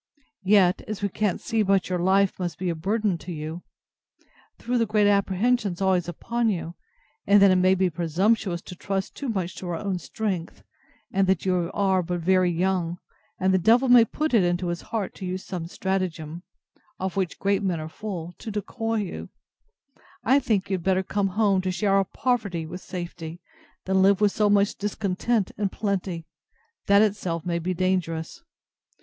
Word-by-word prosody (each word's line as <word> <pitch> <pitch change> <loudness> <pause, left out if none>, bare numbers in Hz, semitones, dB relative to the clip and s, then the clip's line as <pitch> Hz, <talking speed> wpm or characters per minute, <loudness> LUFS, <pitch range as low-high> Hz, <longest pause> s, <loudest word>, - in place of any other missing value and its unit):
Yet, 190 -2 +4
as 210 -1 -5
we 200 - +1
can't 210 -1 -1
see 225 -2 -1
but 195 -2 +2
your 180 -1 -1
life 190 +2 +2
must 175 -2 -3
be 185 -1 -2
a - - -1
burthen 195 +2 0
to 180 - -8
you, 160 +2 -5 1.0
through 245 0 -1
the 230 - +1
great 210 0 +3
apprehensions 200 0 +1
always 185 -3 +2
upon 230 +7 -1
you; 170 -4 -3 0.5
and 205 0 +7
that 200 -1 +7
it 185 - +4
may 185 +1 +4
be 190 0 +2
presumptuous 175 +2 0
to 180 - -9
trust 195 +1 -3
too 280 - -5
much 190 -5 -2
to 185 - -6
our 170 - -1
own 190 +1 -2
strength; 190 -5 -4 0.5
and 195 0 +2
that 190 -1 +1
you 180 -2 +1
are 190 -2 +2
but 175 0 -3
very 185 +1 +3
young; 175 0 0 0.4
and 190 0 +2
the 190 - +4
devil 240 +7 +4
may 245 -1 +8
put 305 +6 -2
it 220 -5 +5
into 175 0 0
his 175 0 -3
heart 215 -4 -4
to 190 - -8
use 185 +1 -4
some 175 -3 -5
stratagem, 175 -4 -3 0.6
of 190 -1 -3
which 190 -3 -1
great 200 0 +1
men 185 -4 -1
are 155 - -5
full, 175 -1 -6
to 225 - -7
decoy 225 +2 -3
you: 190 - -6 0.9
I 265 +4 +4
think 200 -7 -1
you 190 - +2
had 170 - -10
better 190 +1 +2
come 200 +1 0
home 200 -1 +2
to 185 - -2
share 195 +2 +1
our 195 0 +4
poverty 200 -7 -1
with 180 +3 -8
safety, 175 -2 -7 0.5
than 190 0 +2
live 195 0 +5
with 210 -1 +3
so 210 0 +2
much 205 0 +3
discontent 205 +1 -1
in 210 - +1
a - - +1
plenty, 190 -5 -3 0.6
that 200 +1 +6
itself 185 -6 -1
may 170 -1 -1
be 180 +2 -2
dangerous. 175 - -1
190 Hz, 190 wpm, -25 LUFS, 175-205 Hz, 1.0 s, may